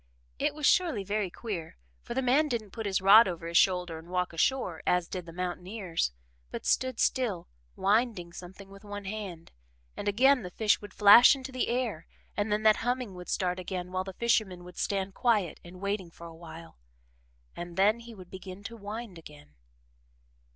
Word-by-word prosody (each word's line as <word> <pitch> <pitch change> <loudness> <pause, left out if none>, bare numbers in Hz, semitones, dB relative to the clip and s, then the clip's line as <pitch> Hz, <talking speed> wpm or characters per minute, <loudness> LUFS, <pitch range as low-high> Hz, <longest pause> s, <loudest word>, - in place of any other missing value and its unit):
It - - 0
was 305 -1 -2
surely 320 - +3
very 205 0 -1
queer, 175 - -6 0.2
for 235 - -7
the 265 - 0
man 275 +5 +3
didn't 225 -7 -3
put 225 -1 -5
his 190 -1 0
rod 205 +4 +8
over 170 -2 -5
his 170 0 -5
shoulder 180 -3 +2
and 165 +2 -15
walk 180 -1 -1
ashore, 175 -1 0
as 180 -1 +2
did 180 -2 -6
the - - -8
mountaineers, 180 - -3 0.4
but - - -7
stood 255 -2 +1
still, 225 -10 0 0.3
winding 200 -4 +1
something 190 +3 -11
with 195 +1 -13
one 205 -1 -7
hand, 190 -5 -6 0.4
and - - -5
again 255 +6 +4
the 180 - -6
fish 210 +3 +1
would 205 - -10
flash 215 +6 +9
into 265 0 -8
the 255 -1 -1
air 235 -9 -2 0.3
and 205 +1 -1
then 210 +1 +1
that 215 -1 +6
humming 245 -3 -2
would 180 -1 -10
start 180 -1 -1
again 180 0 -5
while 185 0 -1
the 190 0 -8
fisherman 210 -5 0
would 180 0 -11
stand 195 -1 -1
quiet 210 -9 +1
and 180 +1 -12
waiting 200 -3 -2
for 170 0 -13
a 165 - -9
while 165 - -12 0.8
and 175 0 -7
then 210 +4 +4
he 235 -1 -11
would 185 -3 -13
begin 190 +1 -9
to 230 +3 -7
wind 210 -3 -7
again. 75 - -14
195 Hz, 190 wpm, -29 LUFS, 180-225 Hz, 0.8 s, flash